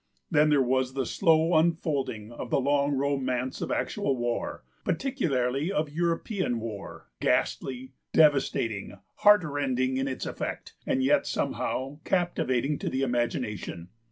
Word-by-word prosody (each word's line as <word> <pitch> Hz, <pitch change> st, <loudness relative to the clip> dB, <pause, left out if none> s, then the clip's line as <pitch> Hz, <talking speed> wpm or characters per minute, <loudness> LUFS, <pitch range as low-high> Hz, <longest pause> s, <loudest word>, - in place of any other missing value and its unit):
Then 150 Hz, +1 st, +4 dB
there 145 Hz, -3 st, +4 dB
was 130 Hz, +1 st, 0 dB
the 135 Hz, -2 st, 0 dB
slow 160 Hz, +4 st, +3 dB
unfolding 155 Hz, -9 st, 0 dB
of 120 Hz, -, -7 dB
the -, -, +2 dB
long 140 Hz, +1 st, +2 dB
romance 130 Hz, -2 st, -1 dB
of -, -, -2 dB
actual 135 Hz, -2 st, -1 dB
war, 120 Hz, 0 st, -2 dB, 0.2 s
particularly 155 Hz, -, 0 dB
of 155 Hz, -6 st, -1 dB
European 170 Hz, -, -1 dB
war, 110 Hz, -, -8 dB
ghastly, 130 Hz, 0 st, 0 dB, 0.2 s
devastating, 125 Hz, -9 st, +2 dB, 0.2 s
heartrending 140 Hz, -10 st, +3 dB
in 135 Hz, +1 st, 0 dB
its 130 Hz, -, -4 dB
effect, -, -, -5 dB
and 130 Hz, -, +1 dB
yet 140 Hz, +3 st, +3 dB
somehow 135 Hz, +3 st, -2 dB
captivating 150 Hz, -6 st, 0 dB
to -, -, -2 dB
the 130 Hz, +1 st, -1 dB
imagination. 120 Hz, -8 st, -2 dB
135 Hz, 130 wpm, -28 LUFS, 125-155 Hz, 0.2 s, Then